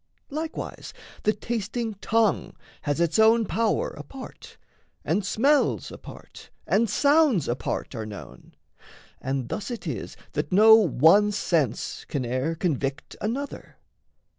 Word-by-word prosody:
Likewise 315 +2 -5 0.3
the 215 - +3
tasting 225 +1 -3
tongue 220 -3 +1 0.3
Has 145 +1 -1
its 170 +2 +1
own 225 +1 +5
power 225 +2 0
apart, 205 - -11 0.5
and 210 - +1
smells 280 +9 +2
apart - - -12 0.2
And 220 +3 +2
sounds 285 - +3
apart 120 +3 -3
are 110 -3 -5
known. 105 -2 -11 0.7
And 130 -2 -3
thus 210 - -4
it 240 -2 -6
is - - -5
That - - -3
no 215 +4 +8
one 205 - +5
sense 155 - -1
can 135 -4 -3
e'er 130 +7 -1
convict 140 -5 -2
another. 265 +7 -4
205 Hz, 120 wpm, -25 LUFS, 145-230 Hz, 0.7 s, no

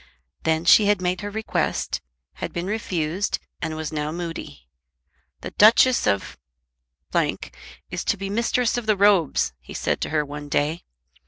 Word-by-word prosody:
Then 160 +1 +1
she 205 +3 +7
had 205 -2 +3
made 180 0 -1
her 205 - -4
request, 220 +1 -2 0.4
had - - -4
been 170 +1 -3
refused, 190 -3 -1 0.2
and 160 - -3
was 155 -1 -4
now 150 0 -2
moody. 165 - -6 0.7
"The - - -6
Duchess 235 +4 +5
of 100 -1 -1 0.7
is 65 - -3
to 210 - +1
be 195 0 -4
Mistress 235 +3 +1
of 225 - -10
the 215 -2 +3
Robes," 190 - +3
he - - -11
said - - -1
to - - -2
her 150 -1 0
one 145 0 -8
day. 150 +4 0
175 Hz, 155 wpm, -23 LUFS, 150-205 Hz, 0.7 s, she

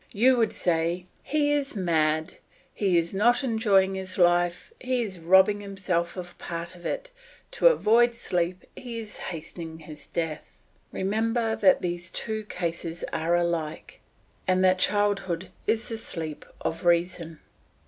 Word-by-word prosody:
You 250 +5 +5
would 225 -3 +2
say, 170 +1 0 0.2
"He 295 -1 +1
is 285 -3 0
mad; 160 -3 +1 0.4
he 190 -4 +2
is 170 +1 0
not 240 +7 +3
enjoying 210 -6 +3
his 190 -1 -5
life, 175 - +2
he 255 -1 0
is 190 -5 -6
robbing 190 +4 +5
himself 190 -3 -2
of 175 -1 -7
part 170 0 -5
of 175 -1 -7
it; - - -4 0.4
to - - +4
avoid 240 - +4
sleep 180 -3 -2
he 240 -3 -7
is 220 -2 -7
hastening 165 -1 -7
his 155 -2 -12
death." 160 -2 -4 0.3
Remember 225 +3 0
that 190 -2 +4
these 175 0 -3
two 220 -1 -4
cases 170 -3 -4
are 165 +2 +1
alike, 170 -3 -2 0.5
and 185 0 +3
that 185 0 +4
childhood 190 -3 0 0.2
is 220 +1 +1
the 225 -1 -4
sleep 160 -8 -6
of 165 +1 -3
reason. 170 -2 +1
185 Hz, 145 wpm, -26 LUFS, 170-220 Hz, 0.5 s, You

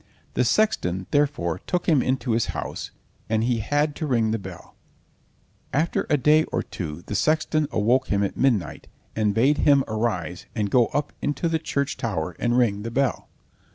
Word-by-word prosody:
The - - +2
sexton, 95 - +1
therefore, 135 - +1
took 180 - -1
him 150 -6 +4
into 130 -1 -1
his 115 0 +1
house, - - -5 0.4
and 110 0 +1
he 120 -1 +1
had 145 +6 0
to 155 - -3
ring 115 -5 +2
the 115 - -1
bell. 95 -3 -11 1.0
After 155 +4 0
a 150 - +4
day 150 +3 +4
or - - -2
two 85 -1 -6
the - - -5
sexton 155 - +1
awoke 120 +5 +2
him 100 0 +1
at 100 - -2
midnight, 110 - 0 0.3
and 105 -2 +1
bade 135 +6 +3
him 140 -2 +5
arise 100 -6 -2
and 105 -3 -1
go 120 -2 +4
up 145 - -2
into 145 +4 -1
the 165 -1 0
church 140 -3 -2
tower 90 -7 -3
and 120 0 +1
ring 105 -5 +2
the 115 - -4
bell. 135 +3 -1
120 Hz, 180 wpm, -24 LUFS, 105-145 Hz, 1.0 s, him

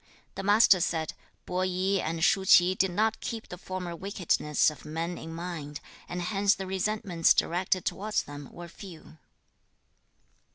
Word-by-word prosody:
The - - -5
Master 205 -1 +5
said, 165 -2 -1 0.3
'Po 180 0 -3
i 185 +1 0
and 165 +1 -2
Shu 195 0 +3
ch'i 180 -1 +6
did 190 0 +1
not 215 +5 0
keep 225 -2 -5
the 180 - -7
former 185 -2 -5
wickednesses 170 -5 +1
of 150 - -13
men 165 +3 -4
in 165 - -8
mind, 165 -4 -6 0.3
and 175 0 -3
hence 200 +2 +2
the 195 - -6
resentments 190 -3 +1
directed 180 +1 0
towards 215 +2 -1
them 145 -1 -9
were 175 0 -9
few.' 170 -3 -12
180 Hz, 155 wpm, -28 LUFS, 165-195 Hz, 0.3 s, ch'i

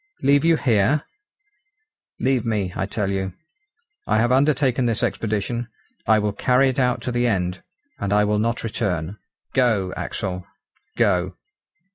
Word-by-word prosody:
"Leave 140 +1 +4
you 165 -1 +4
here!" 125 +4 +2 1.2
"Leave 130 -1 +1
me, 105 -6 -1
I 95 - -2
tell 100 -1 -2
you. 95 -1 -2 0.7
I 110 - +2
have 120 +3 +2
undertaken 130 -2 +2
this 115 -2 0
expedition. 110 +2 -2 0.4
I 110 - +5
will 105 -1 0
carry 130 +5 +3
it 130 +1 -2
out 125 -1 +1
to 125 - -2
the 120 0 +1
end, 90 -4 -1 0.4
and 100 - -2
I 105 0 +4
will 105 0 +1
not 115 +2 -1
return. 100 -4 -2 0.3
Go, 110 -8 +2
Axel, 90 -1 -4 0.5
go!" 95 -6 +1
110 Hz, 145 wpm, -22 LUFS, 100-125 Hz, 1.2 s, I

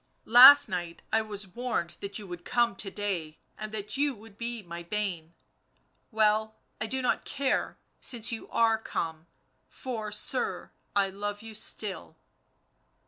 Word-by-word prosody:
Last 255 +5 +10
night 175 -2 -5
I 220 - +4
was 210 -2 -6
warned 210 -4 -3
that 200 0 -4
you 210 - -3
would 175 -2 -8
come 235 -1 +1
to 195 - -4
day 185 -7 -3 0.2
and 215 0 -7
that 210 +2 -4
you 285 -1 +1
would 215 -1 -15
be 235 0 -5
my 170 -1 -7
bane... 175 -3 -3 0.7
well, 220 -1 +2 0.3
I 220 - 0
do 260 +2 -2
not 250 - +1
care 280 -1 -1 0.2
since 235 -3 0
you 225 - -6
arc 225 -1 +2
come, 160 0 -4 0.4
for, 225 -5 -5
sir, 210 - -2 0.2
I 200 -1 +3
love 205 +2 -5
you 225 -1 -9
still." 210 -2 -3
210 Hz, 150 wpm, -29 LUFS, 195-230 Hz, 0.7 s, Last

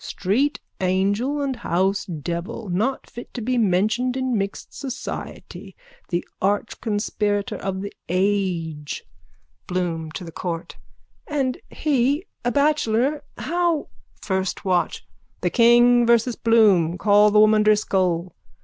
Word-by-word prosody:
Street 255 +11 0 0.2
angel 200 +10 0
and 270 -3 -2
house 195 -2 0
devil. 170 +4 -5
Not 225 +9 -1
fit 240 - -10
to 245 - -3
be 250 +2 0
mentioned 220 +6 +1
in 260 -2 0
mixed 195 -1 -4
society! 265 -3 -7 0.3
The 175 -1 -2
archconspirator 205 0 -1
of 190 -1 -3
the 200 - -6 0.2
age! 180 -5 -1 0.6
BLOOM: 170 -3 -2
(To 185 - -6
the 165 - -8
court.) 170 -1 -5 0.5
And 270 -4 -1
he, 285 +3 +1 0.2
a 245 - +1
bachelor, 285 -1 +1 0.2
how... 345 -2 0 0.3
FIRST 190 -1 -2
WATCH: 180 -2 0 0.4
The - - 0
King 240 0 +5
versus 235 0 +3
Bloom. 200 -7 +4
Call 205 +3 +5
the 210 0 +4
woman 215 0 +6
Driscoll. 185 -5 +1
210 Hz, 120 wpm, -23 LUFS, 185-245 Hz, 0.6 s, woman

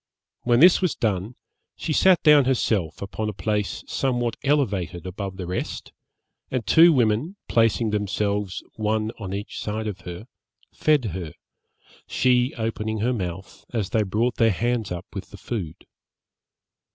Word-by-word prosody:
When 120 +1 +3
this 180 +3 +7
was 180 -4 +1
done, 105 +1 -1 0.4
she 155 - -3
sat 185 +3 +4
down 150 -3 +7
herself 105 -10 0
upon 105 +2 -3
a - - -4
place 105 0 -2
somewhat 120 -3 -1
elevated 100 - 0
above 95 +1 -5
the 95 - -5
rest, 90 +1 -4 0.6
and 125 -4 -2
two 170 +1 +7
women, 125 - +1
placing 115 -1 +2
themselves, 105 -1 -1
one 110 0 0
on 95 -3 -5
each 100 +1 -5
side 110 +1 -3
of 100 -3 -5
her, 90 +4 -8 0.5
fed 150 -5 +2
her, 85 -4 -5 0.7
she 125 0 +2
opening 110 -1 -2
her 125 +3 +1
mouth 95 -4 -6
as 110 -5 -2
they 110 - +2
brought 110 +5 0
their 115 - +4
hands 115 +1 -1
up 90 -1 -4
with - - -6
the - - -11
food. 90 -9 -5
110 Hz, 150 wpm, -24 LUFS, 100-125 Hz, 0.7 s, this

